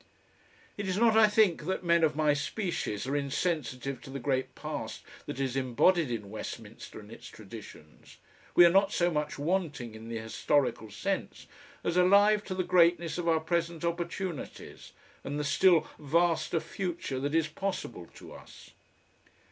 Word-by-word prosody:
It 200 -1 -3
is 185 0 -1
not, 225 0 +4
I 220 -1 +7
think, 210 -7 +2
that 190 +1 -2
men 170 -1 +3
of 155 -2 +3
my 155 -1 +3
species 145 - -3
are 135 +2 -2
insensitive 140 -3 -2
to - - -11
the 135 - -5
great 130 0 -2
past - - -6 0.2
that 130 - -5
is 135 -2 -1
embodied 135 +5 +2
in 105 -4 -5
Westminster 110 0 -8
and 105 0 -13
its 120 +1 -11
traditions; 105 -9 -13 0.4
we 175 - +9
are 170 - +6
not 195 +2 +4
so 175 -2 +1
much 150 -1 -2
wanting 150 - -2
in 110 +1 -10
the 115 - -3
historical 110 +1 0
sense - - -3 0.4
as 170 - 0
alive 205 +3 +5
to 185 - -4
the 185 - 0
greatness 175 -1 +3
of 170 - -3
our 165 -1 +3
present 170 0 -1
opportunities 170 -1 -5 0.3
and 145 +2 -4
the - - -1
still 170 +3 +4
vaster 165 +2 +1
future 170 -7 -4
that 145 +3 -2
is 165 -1 +3
possible 155 - -5
to - - -12
us. - - -14
160 Hz, 165 wpm, -30 LUFS, 130-180 Hz, 0.4 s, we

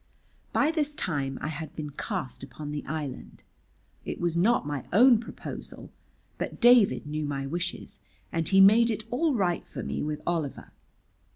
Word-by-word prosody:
By 305 - +3
this 300 -2 -1
time 140 - -2
I 150 - -1
had 155 0 -6
been 150 -2 -5
cast 165 - -4
upon 145 +2 -7
the 150 -1 -4
island. 150 -3 -6 0.6
It - - -5
was 170 -1 0
not 200 +2 +3
my 145 -3 -3
own 240 +4 +7
proposal, 230 - -8 0.5
but - - -4
David 240 -8 +5
knew 150 +1 -3
my 135 -1 -3
wishes, 175 +5 -4 0.3
and 165 -1 -1
he 195 0 +6
made 220 +4 +7
it 220 -1 -2
all 295 +3 +1
right 180 -5 0
for - - -7
me - - -3
with 150 0 -2
Oliver. 165 -5 -3
170 Hz, 165 wpm, -28 LUFS, 150-225 Hz, 0.6 s, own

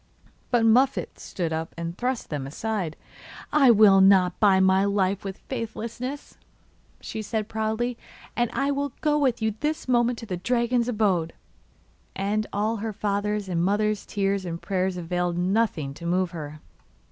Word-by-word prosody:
But 240 -2 +3
Muffette 255 +4 +2
stood 170 -3 -3
up 160 +1 -4
and 170 0 -4
thrust 250 -1 -3
them 140 -3 -3
aside. 185 +1 -3 0.6
'I 280 -4 +6
will 205 -4 +7
not 190 -2 +5
buy 195 -3 +5
my 190 0 +4
life 200 -1 0
with 195 -1 -5
faithlessness,' 245 +3 -5 0.6
she 220 - -5
said 215 0 -3
proudly; 220 +2 -2 0.4
'and 240 -1 +1
I 275 +1 0
will 280 -1 -2
go 300 -1 +2
with 250 -5 +1
you 220 -1 +1
this 305 -1 -2
moment 240 -1 +2
to 230 - -8
the 185 -4 -4
dragon's 235 +4 +1
abode.' 195 -8 +1 0.8
And 210 +2 -1
all 215 +3 0
her 220 +1 -4
father's 205 0 -1
and 170 -2 0
mother's 210 +2 +1
tears 195 -1 0
and 170 -2 -5
prayers 185 +1 -1
availed 175 0 -2
nothing 180 -6 0
to 170 +4 -7
move 180 0 +1
her. 150 -2 -7
205 Hz, 160 wpm, -25 LUFS, 185-230 Hz, 0.8 s, will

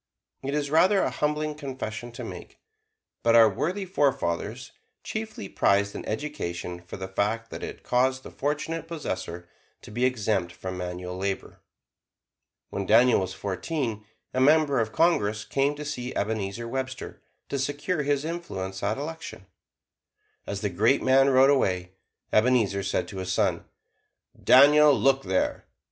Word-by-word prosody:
It 140 +2 -3
is 145 -1 -1
rather 190 +5 +5
a - - 0
humbling 150 0 -1
confession 130 -5 -6
to - - -7
make, - - -9 0.6
but 115 0 +4
our 115 -1 +8
worthy 175 - -2
forefathers 125 - -1 0.3
chiefly 220 - -5
prized 100 +1 +2
an - - -6
education 90 - -4
for 90 +3 -9
the 95 0 -5
fact 105 +4 -1
that - - -6
it - - -7
caused 130 +1 +1
the - - -10
fortunate 155 +3 -3
possessor 95 - -5 0.4
to - - -11
be 120 +4 -2
exempt 105 -8 0
from 95 -1 -6
manual 90 0 -5
labor. 95 0 -4 1.1
When 100 -1 -3
Daniel 120 +3 +6
was 95 - -3
fourteen, 110 - -3 0.3
a 130 - +1
member 145 -1 +4
of 110 -1 -1
Congress 110 -9 +2
came 140 +2 +1
to 150 +1 -7
see 130 -4 -4
Ebenezer 110 +1 -2
Webster, 130 +1 -5 0.3
to 140 - -2
secure 145 +5 -1
his 145 0 0
influence 95 - -5
at 100 - 0
election. 160 -8 -7 1.0
As 100 -1 -4
the 105 - 0
great 130 +10 +2
man 135 +1 +5
rode 135 +1 +6
away, 90 -9 +1 0.4
Ebenezer 110 -4 +3
said 100 0 -1
to 100 - -8
his 95 -1 -3
son: - - 0 0.8
"Daniel, 145 +2 +7
look 135 0 +3
there! 95 -3 -1
125 Hz, 150 wpm, -26 LUFS, 100-145 Hz, 1.1 s, our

